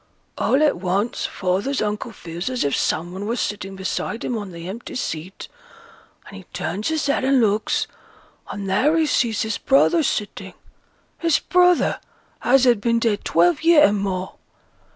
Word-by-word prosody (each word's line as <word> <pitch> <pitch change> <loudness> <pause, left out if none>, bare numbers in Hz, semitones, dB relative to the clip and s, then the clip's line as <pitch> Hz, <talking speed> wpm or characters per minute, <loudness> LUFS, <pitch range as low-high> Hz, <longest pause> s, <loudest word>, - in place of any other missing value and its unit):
All 275 +3 +2
at 295 -9 +2
once 195 +5 -1
father's 195 +9 -1
uncle 210 +2 -2
feels 175 +1 -6
as 255 -1 -1
if 140 - 0
some 170 +2 -1
one 195 +2 -5
were 235 - -1
sitting 195 -4 -4
beside 190 +4 -3
him 245 - -2
on 205 -4 -5
th' - - -11
empty 210 +6 -7
seat; 180 -6 -5 0.8
and 200 - -12
he 190 - -12
turns 200 +5 -3
his 315 -2 -1
head 280 -2 0
and 270 0 +3
looks, 215 -2 +1 0.6
and 200 -1 -5
there 270 +12 +2
he 320 - +3
sees 230 -7 +1
his 220 -1 -3
brother 300 +5 +3
sitting 210 -7 -3 0.6
his 330 -3 +3
brother 360 -1 +3 0.4
as 265 +1 +4
had 240 -5 +4
been 230 +1 +2
dead 225 -3 0
twelve 175 +1 +2
year 325 -2 +6
and 205 0 +1
more. 190 -1 -3
215 Hz, 170 wpm, -22 LUFS, 190-265 Hz, 0.8 s, year